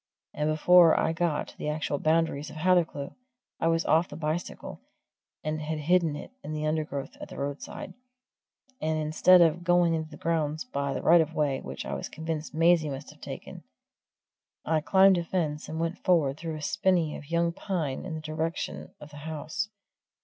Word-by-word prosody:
And 150 +1 -1
before 165 +2 +6
I 160 - +1
got 165 -2 -1
to - - -16
the - - -2
actual 150 -2 -2
boundaries 155 -2 +1
of - - -11
Hathercleugh, 165 -4 +1 0.5
I 165 - +1
was 165 0 +2
off 165 +2 +3
the - - -8
bicycle, 155 +2 -4 0.6
and 155 0 -2
had 155 +1 -3
hidden 165 0 +2
it 145 - -8
in 155 - -5
the 155 0 -2
undergrowth 155 -3 -2
at - - -7
the - - -10
roadside; 140 +1 -5 0.9
and 155 0 0
instead 160 +4 +5
of 170 +1 +3
going 175 -1 +3
into 160 -1 -2
the 155 - -11
grounds 155 0 -1
by 140 - -2
the - - -4
right 170 +1 +7
of 160 +1 -3
way 140 -3 +1
which 65 +1 -7
I 70 - -4
was 70 - -4
convinced 160 -1 -4
Maisie 165 -1 +3
must 135 +1 -7
have - - -20
taken, - - -8 1.0
I 155 0 +1
climbed 190 +2 +5
a - - -2
fence 160 -4 -2
and 160 - -4
went 165 +2 -2
forward 155 -7 +3
through 160 0 -5
a 155 - -7
spinny 170 -2 +1
of 145 - -10
young 170 0 +1
pine 165 -9 -3
in 180 -4 -5
the 155 - -5
direction 155 - -4
of 150 - -12
the 145 - -11
house. 160 +6 -4
155 Hz, 190 wpm, -28 LUFS, 150-170 Hz, 1.0 s, right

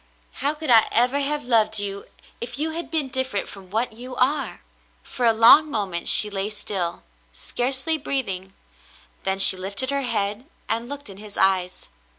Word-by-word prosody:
How 290 +2 -1
could 305 -3 -3
I 225 -2 +6
ever 250 +4 +2
have 290 -1 -2
loved 220 -3 +4
you, 200 -1 -1 0.4
if 240 +2 -4
you 315 +3 -2
had 335 +2 -6
been 310 -5 -1
different 260 -5 -2
from 195 -2 -12
what 225 +3 -2
you 250 +3 -11
are 275 +3 -1 0.2
?" - - -38
For 245 -2 -2
a - - +6
long 230 +8 +6
moment 195 -9 -4
she 210 - +8
lay 195 +1 -4
still 195 -5 -4 0.2
— - - -38
scarcely 270 +6 -2
breathing 195 -9 -4 0.3
— - - -28
then 190 0 -1
she 190 0 +6
lifted 200 +8 -2
her 280 0 -2
head 215 -2 -2 0.2
and 230 +2 0
looked 285 0 -7
in 195 -2 -11
his 210 0 -10
eyes. 185 -1 0
230 Hz, 185 wpm, -22 LUFS, 200-270 Hz, 0.4 s, she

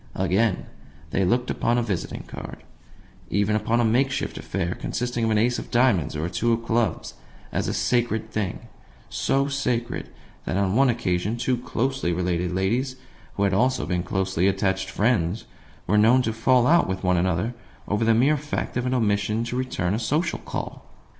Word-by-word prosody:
Again, 95 +2 +1 0.5
they 95 - +1
looked 120 +7 +1
upon 120 +1 +1
a 120 - +2
visiting 100 -7 -3
card - - -9 0.7
even 105 +2 +1
upon 110 +2 +1
a 120 - +3
make 125 +5 +3
shift 135 0 -3
affair 90 -2 -2
consisting 120 -1 -3
of 115 - +2
an 110 - +2
ace 120 +3 +2
of - - -8
diamonds 120 - +2
or 75 +1 -2
a - - -2
two 115 +7 +1
of 115 0 -2
clubs 115 -5 0 0.4
as - - -1
a - - -1
sacred 110 -3 0
thing; 105 -4 -2 0.5
so 135 +1 +1
sacred 125 -4 -2 0.4
that - - -1
on 100 0 +1
one 135 +2 +5
occasion 105 -2 0
two 125 +2 +1
closely 125 -3 -1
related 90 0 -1
ladies 115 +9 0 0.4
who 100 - 0
had 100 -1 +2
also 130 +6 +2
been 90 -1 -1
closely 95 0 0
attached 95 -1 0
friends 100 -2 0 0.4
were 105 +3 +3
known 120 +4 +5
to 110 - -1
fall 125 +2 +3
out 170 +5 +4
with 95 0 -3
one 90 -1 +3
another 90 +6 0 0.3
over 105 +3 0
the 115 0 +4
mere 140 +6 +4
fact 145 -3 -3
of 125 +1 -1
an 130 - +1
omission 105 -1 +1
to 120 +1 -4
return 125 -8 -1
a 110 - 0
social 155 +7 0
call! - - -6
110 Hz, 185 wpm, -24 LUFS, 95-125 Hz, 0.7 s, one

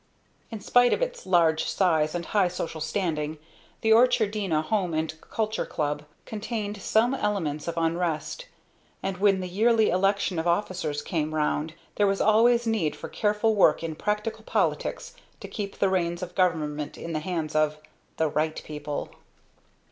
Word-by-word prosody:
In 225 - -6
spite 245 +4 +4
of - - +1
its - - -5
large 165 -3 +3
size 160 -4 +1
and 170 -1 -3
high 200 0 +2
social 165 -3 -5
standing, 155 -2 -2 0.4
the 220 - +2
Orchardina 215 -8 +3
Home 180 -1 0
and 160 0 -1
Culture 220 -1 -2
Club 150 -1 -2 0.2
contained 210 -2 -4
some 230 +6 +2
elements 180 - -2
of 170 - -3
unrest, 165 - -1 0.6
and 190 -1 -2
when 195 -1 +3
the 185 - -4
yearly 220 +4 +3
election 195 -1 +1
of 160 - -2
officers 170 -5 -1
came 155 -3 -2
round 155 +1 -1 0.2
there 205 - +4
was 195 0 +1
always 235 +3 +4
need 215 -9 0
for - - -8
careful 210 +1 +1
work 180 -6 +4
in 165 -1 -3
practical 210 +5 -2
politics - - -1 0.3
to - - -8
keep 200 -2 -5
the 195 - +2
reins 175 -2 0
of 180 0 -7
government 155 -5 0
in 165 - -6
the 155 - 0
hands 160 -2 -3
of 155 0 +2 0.4
"the 160 - +2
right 155 +1 -1
people." 150 -1 -5
180 Hz, 160 wpm, -26 LUFS, 155-210 Hz, 0.6 s, spite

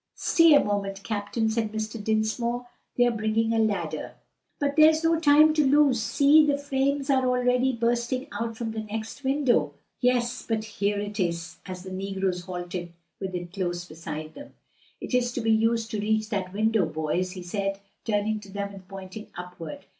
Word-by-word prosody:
"Stay 330 -3 +5
a 285 - +5
moment, 200 -1 -2
captain," 215 +1 -1
said 220 -1 -1
Mr. 220 0 -4
Dinsmore, 220 +3 0 0.3
"they 245 - +5
are 240 - +3
bringing 225 0 0
a 225 - +2
ladder." 215 -2 -1 0.5
"But 285 -1 0
there's 315 +1 +6
no 330 0 +3
time 305 0 +6
to 305 -1 +3
lose; 275 -3 +4
see! 285 +7 +5
the 290 -1 +2
flames 280 0 0
are 260 -1 +3
already 250 +1 +2
bursting 240 +2 0
out 230 -1 -4
from 230 -2 -3
the 220 - -4
next 220 +5 -6
window." 270 -1 +2 0.2
"Yes, 245 0 +1
but 220 -2 0
here 205 -2 -1
it 205 +1 -4
is," 170 -1 -2
as 185 -1 -7
the 190 - -8
negroes 190 -2 -2
halted 175 -1 -5 0.3
with 190 -1 -4
it 175 0 -6
close 175 -3 -2
beside 155 -1 -7
them. 285 - -12 0.4
"It - - -7
is 245 -1 +2
to 245 - -2
be 225 0 +2
used 225 +1 +2
to 215 - -2
reach 215 0 0
that 190 -4 -2
window, 215 -2 +2
boys," 160 +4 -2
he 185 -2 -8
said, 195 +2 -2 0.2
turning 215 0 0
to 200 -2 -13
them 200 0 -4
and 190 -2 -12
pointing 195 +3 -9
upward. 180 -3 -8
220 Hz, 185 wpm, -26 LUFS, 195-250 Hz, 0.5 s, there's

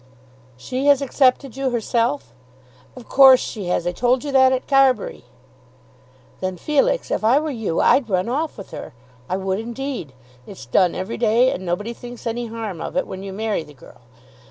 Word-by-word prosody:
"She 255 - -3
has 285 -2 +6
accepted 270 -1 +1
you, 270 -1 -1
herself?" 235 - -1 0.6
"Of 250 -2 -12
course 265 -1 +7
she 210 -4 -5
has. 175 -1 0
I 175 - 0
told 245 +7 +1
you 290 - -4
that 260 -1 +5
at 260 -1 -2
Carbury." 270 - +2 1.1
"Then, 185 -1 -3
Felix, 475 - 0
if - - -1
I 240 +6 +4
were 310 0 -3
you 225 -10 -2
I'd 255 -5 +3
run 185 0 0
off 295 +6 -2
with 195 - -10
her. - - -9 0.3
I 185 - 0
would 190 0 -2
indeed. 235 - -5 0.3
It's 130 - -10
done 175 +9 +2
every 190 +4 -4
day, 235 +3 +3
and 185 - -5
nobody 185 +6 -3
thinks 245 0 -11
any 235 +1 -3
harm 220 -6 -6
of - - -5
it 275 - +1
when 190 0 -8
you 195 0 -7
marry 215 -1 -2
the 150 -2 -14
girl. - - -17
235 Hz, 185 wpm, -21 LUFS, 190-265 Hz, 1.1 s, course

